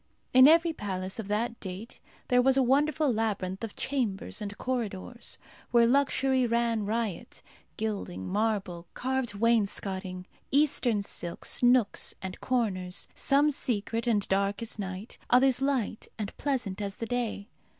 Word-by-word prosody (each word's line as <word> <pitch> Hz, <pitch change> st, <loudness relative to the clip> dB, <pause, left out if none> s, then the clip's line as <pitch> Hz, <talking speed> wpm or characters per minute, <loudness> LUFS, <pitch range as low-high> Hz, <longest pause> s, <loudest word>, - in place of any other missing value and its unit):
In 255 Hz, +1 st, +9 dB
every 330 Hz, +1 st, +5 dB
palace 190 Hz, -5 st, -4 dB
of 215 Hz, -, -4 dB
that 230 Hz, +3 st, -1 dB
date 190 Hz, +4 st, -7 dB, 0.3 s
there 250 Hz, 0 st, +5 dB
was 265 Hz, +1 st, +4 dB
a 265 Hz, -, +5 dB
wonderful 290 Hz, +2 st, +2 dB
labyrinth 205 Hz, -3 st, -2 dB
of 225 Hz, -, -5 dB
chambers 235 Hz, -8 st, -2 dB
and 205 Hz, -1 st, -5 dB
corridors, 240 Hz, -2 st, -4 dB, 0.3 s
where 235 Hz, -1 st, +5 dB
luxury 265 Hz, 0 st, +2 dB
ran 230 Hz, -2 st, +1 dB
riot; 220 Hz, -4 st, -3 dB, 0.3 s
gilding, 200 Hz, -, -3 dB
marble, 195 Hz, -5 st, -1 dB
carved 260 Hz, -4 st, -1 dB
wainscoting, 200 Hz, -4 st, 0 dB, 0.2 s
Eastern 260 Hz, -7 st, +2 dB
silks; 170 Hz, -3 st, -3 dB
nooks 245 Hz, -3 st, +3 dB
and 190 Hz, -1 st, -7 dB
corners, 195 Hz, -8 st, -1 dB
some 290 Hz, +2 st, +3 dB
secret 230 Hz, -3 st, -1 dB
and 210 Hz, -4 st, +1 dB
dark 200 Hz, +3 st, 0 dB
as 220 Hz, -, -5 dB
night, 190 Hz, +2 st, -6 dB
others 255 Hz, +1 st, +4 dB
light 270 Hz, -6 st, -1 dB
and 210 Hz, -2 st, -5 dB
pleasant 240 Hz, -9 st, -2 dB
as 200 Hz, -1 st, -3 dB
the 230 Hz, -, -4 dB
day. 230 Hz, -4 st, -2 dB
225 Hz, 140 wpm, -29 LUFS, 200-255 Hz, 0.3 s, In